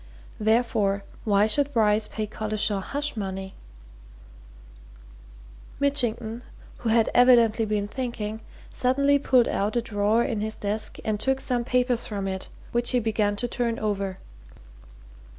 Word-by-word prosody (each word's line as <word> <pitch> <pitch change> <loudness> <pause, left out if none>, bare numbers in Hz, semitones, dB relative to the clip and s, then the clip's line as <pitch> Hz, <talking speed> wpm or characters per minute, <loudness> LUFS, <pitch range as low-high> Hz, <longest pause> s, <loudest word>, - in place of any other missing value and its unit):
Therefore, 215 -3 +1 0.2
why 205 -1 +4
should 280 +6 +1
Bryce 215 -3 +2
pay 215 - -4
Collishaw 215 -1 -1
hush 290 +7 -3
money?" 190 -2 -5 2.3
Mitchington, 240 -5 0 0.4
who 230 - -3
had 225 0 +3
evidently 235 -3 +5
been 210 -1 -1
thinking, 220 -3 -4 0.3
suddenly 280 +3 +2
pulled 255 -3 +3
out 205 +4 -1
a 240 - +2
drawer 215 +1 +1
in 220 -4 -2
his 220 0 -2
desk 210 +1 -3
and 215 -1 -1
took 265 +4 +1
some 245 -3 0
papers 250 -1 0
from 200 -3 -3
it 190 -1 -5 0.2
which 240 0 +1
he 250 - +2
began 215 -2 0
to 245 +4 -2
turn 235 -1 -1
over. 200 -3 -2
220 Hz, 135 wpm, -25 LUFS, 210-245 Hz, 2.3 s, evidently